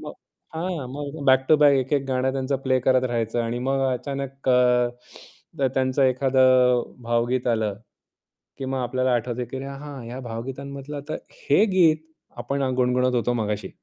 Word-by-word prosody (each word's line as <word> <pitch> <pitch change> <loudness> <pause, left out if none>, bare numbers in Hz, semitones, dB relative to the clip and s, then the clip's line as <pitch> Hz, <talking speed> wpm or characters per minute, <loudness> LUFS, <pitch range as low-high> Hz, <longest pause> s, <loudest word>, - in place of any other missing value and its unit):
मग - - -7 0.4
हां, 165 -4 -3
मग 145 +1 -6
बॅक 130 -1 +4
टू 155 - +7
बॅक 145 -1 +6
एक-एक 135 +2 0
गाणं 130 0 0
त्यांचा 135 +1 -1
प्ले 130 -1 +2
करत 130 +1 +3
राहायचं 120 -1 -1
आणि 115 +1 -2
मग 135 0 +1
अचानक 135 +1 -5
अ, 125 -1 +4 0.7
जर 135 -1 +2
त्यांचं 130 +1 +1
एखादं 130 -1 +4 0.2
भावगीत 120 +2 0
आलं, 110 -4 0 0.8
की 135 - -5
मग 130 0 -2
आपल्याला 130 0 0
आठवतं, 120 +1 -2
की 135 - -5
"अरे, 135 +1 -5
हां, 140 -1 -8
ह्या 125 +3 -6
भावगीतांमधलं 135 +4 -6
तर 155 - -2 0.3
हे 220 - +4
गीत 165 -4 +5 0.4
आपण 140 0 -2
अ, 130 - 0
गुणगुणत 125 0 +2
होतो 120 +1 +1
मघाशी." 105 0 -3
130 Hz, 165 wpm, -24 LUFS, 125-140 Hz, 0.8 s, टू